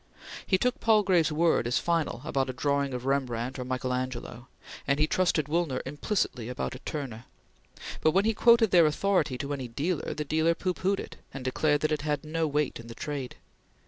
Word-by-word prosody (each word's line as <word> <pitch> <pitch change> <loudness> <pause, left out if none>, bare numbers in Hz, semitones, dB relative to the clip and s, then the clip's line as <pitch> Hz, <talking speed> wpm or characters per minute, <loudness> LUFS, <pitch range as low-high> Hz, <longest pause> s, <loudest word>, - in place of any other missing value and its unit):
He 190 - +3
took 250 +8 0
Palgrave's 195 -7 +3
word 160 -5 +2
as 120 -1 +1
final 165 -5 -1
about 135 -1 0
a - - -3
drawing 140 +1 0
of 125 0 -5
Rembrandt 130 -2 -1
or - - -2
Michael 130 0 -2
Angelo, 125 -1 -4 0.4
and 140 0 +2
he 150 - +3
trusted 165 -2 +1
Woolner 155 -4 0
implicitly 135 - -2
about 125 - -3
a 130 - -8
Turner; 130 -7 -6 0.8
but 155 - +4
when 195 +6 +2
he 225 - +3
quoted 230 -1 +5
their 170 -3 +6
authority 155 -4 +1
to 140 +2 -3
any 135 -3 -4
dealer, 150 +9 -2
the 150 - -3
dealer 160 +3 +2
pooh 185 +1 -1
poohed 195 +2 0
it, - - -8 0.2
and 135 -2 -6
declared 145 +3 +1
that 155 - +1
it 150 - 0
had 150 -1 -1
no 160 +1 -1
weight 150 -3 -1
in 115 - -10
the 115 - -9
trade. 140 -3 -5
150 Hz, 200 wpm, -28 LUFS, 130-170 Hz, 0.8 s, their